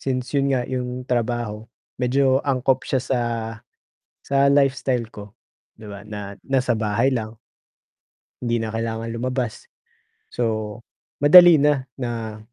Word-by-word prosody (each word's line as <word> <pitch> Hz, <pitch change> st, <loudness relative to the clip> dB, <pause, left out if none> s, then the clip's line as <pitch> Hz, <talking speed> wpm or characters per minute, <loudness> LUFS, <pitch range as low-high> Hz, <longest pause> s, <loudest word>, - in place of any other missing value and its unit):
Since 130 Hz, -1 st, -3 dB
yun 140 Hz, -1 st, +1 dB
nga 125 Hz, -2 st, +1 dB
yung 125 Hz, 0 st, -4 dB
trabaho, 120 Hz, -3 st, -2 dB, 0.3 s
medyo 130 Hz, +1 st, +2 dB
angkop 135 Hz, -1 st, 0 dB
siya 135 Hz, -, +1 dB
sa 130 Hz, -1 st, 0 dB, 1.1 s
sa 140 Hz, 0 st, +3 dB
lifestyle 135 Hz, -3 st, +1 dB
ko, 105 Hz, +2 st, -11 dB, 0.4 s
'di 110 Hz, -, -12 dB
ba, 100 Hz, -1 st, -9 dB
na 105 Hz, -1 st, -7 dB
nasa 130 Hz, -2 st, 0 dB
bahay 110 Hz, +4 st, +1 dB
lang, 110 Hz, -1 st, -4 dB, 1.1 s
hindi 120 Hz, -1 st, 0 dB
na 110 Hz, 0 st, -4 dB
kailangang 115 Hz, 0 st, -3 dB
lumabas. 125 Hz, -1 st, -4 dB, 0.6 s
So, 110 Hz, -2 st, -2 dB, 0.4 s
madali 170 Hz, +2 st, +8 dB
na, 145 Hz, -2 st, +2 dB, 0.2 s
na 115 Hz, -3 st, -4 dB
125 Hz, 125 wpm, -22 LUFS, 110-135 Hz, 1.1 s, madali